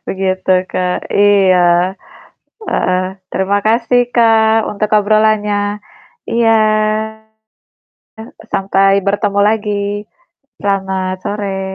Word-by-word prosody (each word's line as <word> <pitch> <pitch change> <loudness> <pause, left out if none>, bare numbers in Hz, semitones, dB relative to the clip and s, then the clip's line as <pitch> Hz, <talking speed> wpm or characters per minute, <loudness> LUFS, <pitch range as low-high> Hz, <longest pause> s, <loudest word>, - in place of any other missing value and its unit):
Begitu, 185 -1 0
Kak, 180 0 -2
iya, 185 -3 +3 0.7
heeh. 185 - 0 0.3
Terima 195 +1 0
kasih, 240 +2 +2
Kak, 225 -1 +3
untuk 210 +1 -2
obrolannya. 210 -1 +1 0.5
Iya, 230 -1 +2 2.0
sampai 195 0 +2
bertemu 200 0 0
lagi. 205 -1 -2 0.5
Selamat 190 -2 -2
sore. 200 -2 -3
205 Hz, 75 wpm, -14 LUFS, 190-215 Hz, 2.0 s, iya